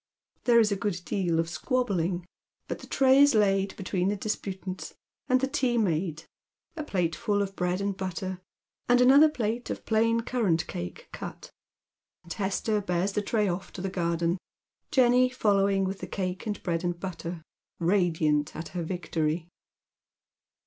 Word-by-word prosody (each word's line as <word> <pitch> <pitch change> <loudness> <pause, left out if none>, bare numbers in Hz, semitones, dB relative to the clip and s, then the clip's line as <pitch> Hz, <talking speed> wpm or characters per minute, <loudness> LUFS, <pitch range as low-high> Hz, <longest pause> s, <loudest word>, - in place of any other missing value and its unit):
There 235 -1 +6
is 220 -2 +4
a - - +2
good 195 -2 -2
deal 175 -4 0
of 165 - +1
squabbling, 185 - -1 0.4
but - - -4
the - - -11
tray 265 0 +4
is 285 -3 +6
laid 195 -2 +2
between 185 -1 -1
the 205 - +1
disputants, 190 -2 -4 0.3
the 255 +1 +3
tea 255 -3 +1
made, 170 -6 0 0.5
a 310 - -4
plateful 195 - 0
of 195 0 -6
bread 180 0 0
and 200 -1 -1
butter, 185 0 -4 0.5
and 245 0 +6
another 275 +5 +7
plate 235 -3 -2
of - - -5
plain 230 +1 +2
currant 215 -9 0
cake 85 0 -6
cut, - - -8 0.7
and 170 - -6
Hester 205 +2 0
bears 180 0 0
the 210 - +1
tray 210 0 +1
off 180 +1 -3
to 185 - -6
the 195 - -1
garden, 170 0 0 0.5
Jenny 255 -1 +4
following 200 -5 +2
with 190 +1 -2
the - - -6
cake 185 +1 -3
and 205 -2 -3
bread 170 -2 -1
and 175 -1 -2
butter, 175 -3 -5 0.3
radiant 165 -5 +1
at 160 - -6
her 175 +1 -4
victory. 165 -1 -2
195 Hz, 155 wpm, -28 LUFS, 175-220 Hz, 0.7 s, another